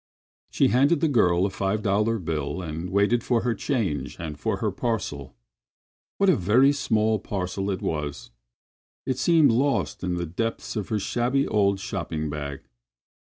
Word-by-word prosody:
She - - +2
handed 140 +6 +3
the 160 - +2
girl 90 - +3
a 100 - -1
five 100 +2 -1
dollar 105 +3 +1
bill 80 -4 -3
and 80 +2 -5
waited 100 +5 +2
for 120 -2 +1
her 120 -1 0
change 95 - -2
and 80 -3 -5
for 110 -3 -1
her 105 +1 -1
parcel. 90 - -3 0.8
What 200 - +2
a 185 - +6
very 115 +8 +4
small 110 -6 +1
parcel 95 0 -3
it 95 - -3
was! 75 -5 -4 0.7
It 130 -1 -2
seemed 160 -2 +5
lost 135 -1 0
in 90 -1 -1
the 85 0 -2
depths 115 +11 -3
of 105 -3 -3
her 110 - 0
shabby 120 +7 0
old 100 -2 +2
shopping 80 -5 -4
bag. 70 -2 -5
100 Hz, 165 wpm, -25 LUFS, 85-120 Hz, 0.8 s, a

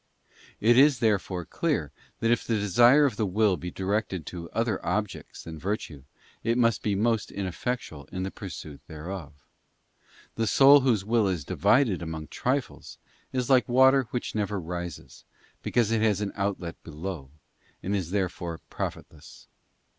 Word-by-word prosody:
It 120 +3 +5
is, 140 -1 +6
therefore, 100 -6 0
clear - - -1 0.3
that 115 - +2
if 120 - +2
the 115 - 0
desire 120 +8 +5
of 125 -7 -1
the 110 - +1
will 100 +1 +2
be 90 0 -6
directed 95 -2 -2
to 85 0 -7
other 115 -3 -1
objects 105 +3 -3
than 80 -1 -8
virtue 85 -7 -4 0.4
it 115 +1 +1
must 115 -2 +2
be 105 -2 0
most 110 +2 +1
ineffectual 95 - -4
in 95 0 -3
the 95 - -3
pursuit 80 -6 -8
thereof. 80 -2 -8 0.9
The 115 -1 -1
soul 140 +7 +7
whose 120 -7 +1
will 110 -1 +2
is 90 -7 -2
divided 115 - +2
among 80 -2 -6
trifles, 130 +1 -3 0.3
is 125 -2 -1
like 130 -1 +4
water 130 +1 +5
which 120 +2 -3
never 105 -1 -1
rises, 85 0 -7 0.4
because 115 -3 +1
it 115 -1 +2
has 105 -3 +2
an 105 -1 -2
outlet 95 -4 -3
below, 80 -3 -7 0.5
and 100 +2 -1
is 90 -4 -2
therefore 90 -3 -2
profitless. 80 +1 -7
100 Hz, 155 wpm, -27 LUFS, 85-115 Hz, 0.9 s, soul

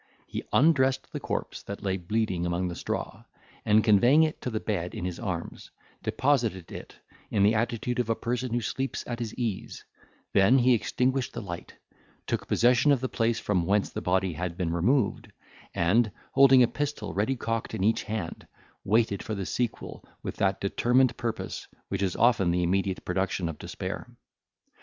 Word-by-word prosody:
He - - -5
undressed 135 -3 +3
the - - -3
corpse - - -4
that 100 +1 -8
lay 95 -1 0
bleeding 95 -1 -1
among 90 +1 -1
the 85 - -5
straw, - - -4 0.4
and, 105 +1 +4
conveying 120 +9 +5
it 155 -1 -2
to - - -3
the 110 -2 -2
bed 90 -6 -3
in 90 - -4
his 90 -2 -4
arms, 90 -7 -5 0.3
deposited 115 - 0
it - - -9 0.3
in 100 - +2
the 105 +2 +5
attitude 115 +2 -1
of 120 -2 0
a 115 - +2
person 125 +2 -2
who 120 +1 0
sleeps 130 +5 -3
at 120 0 -4
his 115 -3 -3
ease; 115 -6 -4 0.5
then 100 +7 +5
he 125 0 +5
extinguished 125 +3 0
the - - -4
light, 85 -3 -7 0.5
took - - -2
possession 125 +4 +4
of 140 - +4
the 130 +1 -3
place 115 0 0
from 90 -5 0
whence 100 +1 +2
the - - -4
body 95 0 +1
had 85 +2 -4
been 85 -2 -1
removed, 105 +6 +1 0.4
and, 105 +6 +3 0.2
holding 135 -2 +7
a - - +4
pistol 145 +3 -3
ready 110 +7 0
cocked 115 -1 -3
in 95 - -2
each 110 +3 +2
hand, 105 -6 -5 0.4
waited 110 -1 +2
for 110 -4 -4
the 100 -2 -3
sequel 120 +3 -3 0.2
with - - -4
that 95 0 +1
determined 120 +6 +2
purpose 115 -2 -4 0.2
which 95 0 -2
is 95 -2 0
often 110 -6 +3
the 90 +1 +1
immediate 95 +1 0
production 95 -1 -1
of 80 -3 -6
despair. - - -6
110 Hz, 180 wpm, -27 LUFS, 95-125 Hz, 0.5 s, holding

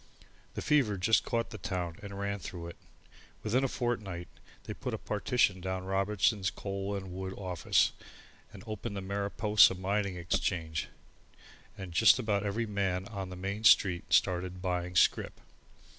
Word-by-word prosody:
The - - -4
fever 135 -9 +2
just 110 +5 +3
caught 115 -1 -2
the 110 - -7
town 90 -3 -3
and 100 -1 -8
ran 100 0 -2
through 85 -2 -7
it! 85 - -10 0.7
Within 120 +5 +1
a - - +3
fortnight 105 -9 -3 0.4
they - - -6
put - - -4
a - - -5
partition 105 -3 +1
down 95 0 -3
Robertson's 100 +1 +1
Coal 100 0 -4
and 95 -2 -6
Wood 95 0 -5
Office 90 -4 +1 0.6
and 100 -2 -11
opened 110 -1 -5
the - - -3
Mariposa 100 +1 +3
Mining 100 +1 -1
Exchange, 85 -2 -1 0.9
and 95 -3 -7
just 110 +10 +6
about 105 -5 0
every 105 +3 -1
man 95 -3 -1
on 100 -4 -5
the 90 - -7
Main 100 +4 -4
Street 90 -5 +4
started 90 0 +2
buying 90 -1 -2
scrip. - - +2
100 Hz, 155 wpm, -31 LUFS, 90-105 Hz, 0.9 s, just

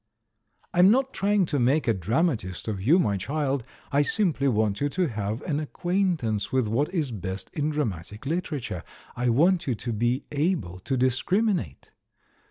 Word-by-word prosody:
I'm 180 +2 +6
not 265 +4 +2
trying 200 -1 +2
to 145 -3 -1
make 135 +5 +2
a 115 - +4
dramatist 105 - -1
of 100 -4 -3
you, 145 - +5
my 105 - +2
child 140 - -1 0.2
— - - -28
I 140 0 +4
simply 155 -4 +1
want 110 -3 +1
you 145 - +2
to 180 +5 0
have 110 +1 -3
an 150 -4 -1
acquaint 175 +1 0
ance 105 -3 -1
with 130 -4 +1
what 130 +9 0
is 155 -8 -1
best 95 -3 -5
in 150 0 0
dramatic 105 - -3
literature; 145 - -3 0.3
I 125 0 0
want 170 +8 +3
you 125 - +1
to 115 +2 -4
be 120 +4 0
able 145 - -1
to 130 +8 -2
discriminate. 130 - 0
135 Hz, 175 wpm, -26 LUFS, 110-165 Hz, 0.3 s, I'm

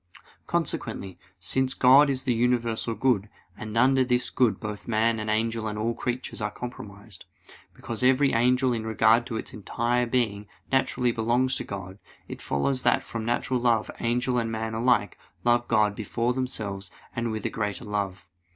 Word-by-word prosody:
Consequently, 95 -2 -2 0.2
since 130 +9 0
God 135 +3 +6
is 130 -1 -1
the 130 -2 +1
universal 115 -1 0
good, 110 -6 +1 0.3
and 110 0 -6
under 130 +2 +4
this 125 -1 +1
good 115 -7 +2
both 105 -1 -6
man 115 0 +2
and 110 0 -3
angel 110 +1 0
and 105 0 -4
all 115 +2 0
creatures 125 0 -4
are 105 - 0
comprised, 105 -4 -9 0.5
because 115 0 -5
every 135 +2 +4
creature 125 +2 +3
in 115 -2 -2
regard 110 +1 +3
to 115 - -3
its - - -6
entire 120 +3 -1
being 110 -4 -1 0.2
naturally 125 -2 +2
belongs 120 +3 +1
to - - -3
God, 95 0 -7 0.3
it - - -8
follows 130 - -1
that - - +2
from 115 -1 -5
natural 120 +2 0
love 120 -3 +1
angel 125 +1 0
and 115 -1 -2
man 110 0 -3
alike 115 -3 +1 0.2
love 120 0 +2
God 105 -2 +3
before 115 +3 -1
themselves 105 -7 -4 0.3
and 115 0 -1
with 110 0 -4
a - - -1
greater 105 +2 -3
love. 100 -3 -3
115 Hz, 170 wpm, -26 LUFS, 110-125 Hz, 0.5 s, God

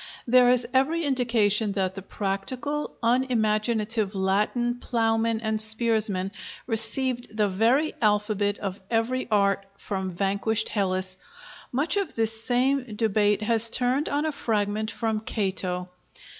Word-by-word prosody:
There 250 0 +5
is 245 -1 +2
every 305 +6 +2
indication 230 -6 +1
that 190 -2 -1
the 195 - -7
practical, 240 +10 -4
unimaginative 220 -3 +1
Latin 210 +6 0
plowmen 225 -1 0
and 220 -1 -1
spearsmen 220 -4 +2 0.3
received 240 0 -1
the 210 -1 +3
very 230 +11 +1
alphabet 210 -1 +1
of 195 -1 -5
every 240 +3 -1
art 200 -2 +2
from 190 -2 -4
vanquished 200 +4 0
Hellas. 185 -2 -1 0.5
Much 285 +10 0
of 395 -5 -2
this 225 0 +1
same 250 -1 0
debate 210 -1 +1
has 230 +1 +5
turned 255 +5 +2
on 290 +2 -1
a 315 - 0
fragment 215 -4 -1
from 220 -2 -2
Cato. 190 -4 -2
220 Hz, 125 wpm, -25 LUFS, 205-245 Hz, 0.5 s, There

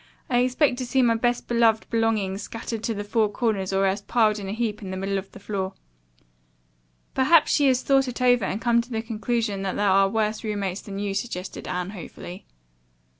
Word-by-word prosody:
I 245 - +4
expect 255 +1 +2
to 255 - -2
see 265 +1 +3
my 235 -1 +4
best 240 +1 0
beloved 230 -2 +3
belongings 215 -4 0
scattered 225 +1 -5
to 225 - -1
the 205 - -3
four 215 +1 +1
corners 205 -3 -1
or 195 0 +2
else 195 +2 0
piled 215 -3 +2
in 195 -1 -6
a - - -2
heap 220 -1 -2
in 195 - -6
the 190 - -4
middle 195 +1 -1
of 190 - -11
the - - -12
floor." 190 -1 -3 1.4
"Perhaps 295 +4 +4
she 290 -2 +4
has 255 -1 +2
thought 270 -1 +3
it 250 - -5
over 245 -3 +4
and 200 - -2
come 235 0 +3
to 235 - -13
the 225 -2 -3
conclusion 225 -2 -2
that 195 -1 -2
there 205 - +1
are 195 0 +4
worse 215 +1 -1
roommates 205 -3 -2
than 195 -1 -7
you," 200 -1 -2
suggested 195 -3 -5
Anne 180 +1 -3
hopefully. 185 0 -9
215 Hz, 210 wpm, -25 LUFS, 195-240 Hz, 1.4 s, I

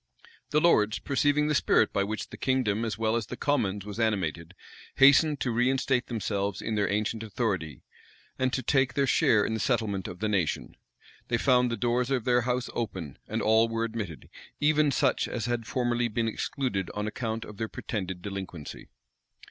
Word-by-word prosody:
The 150 - +3
lords, 110 -10 +3
perceiving 145 +2 +1
the 150 - +1
spirit 140 - +3
by 100 - +2
which 105 +1 -4
the - - -9
kingdom 120 -5 0
as 110 -2 -2
well 110 0 +1
as 115 -3 -2
the 125 - -7
commons 105 -10 0
was 105 +2 -7
animated, 90 -6 -1 0.4
hastened 140 +2 +6
to 125 - 0
reinstate 130 +2 +1
themselves 100 -4 -2
in 110 - -3
their 105 -1 +1
ancient 105 +2 -1
authority, 95 - -3 0.6
and 130 0 +1
to 130 - -2
take 135 -2 +2
their 140 - +2
share 110 -4 +3
in - - -2
the 110 - -2
settlement 110 -7 0
of 90 - -7
the 110 - -1
nation. 95 -7 -1 0.5
They 120 - +1
found 125 0 +3
the 115 - -2
doors 120 +3 0
of 130 -4 0
their 125 -1 +3
house 125 +1 -1
open; 95 - -4
and - - -2
all 110 +1 +4
were 115 0 -1
admitted, 105 - -5 0.3
even 150 0 +3
such 140 - +1
as 115 -3 -3
had 120 -2 -2
formerly 120 -1 0
been 115 +1 -1
excluded 115 -3 -2
on 105 0 -2
account 110 0 -3
of 105 - -11
their 110 0 -3
pretended 95 -5 -5
delinquency. 95 -6 -7
115 Hz, 185 wpm, -28 LUFS, 105-125 Hz, 0.6 s, hastened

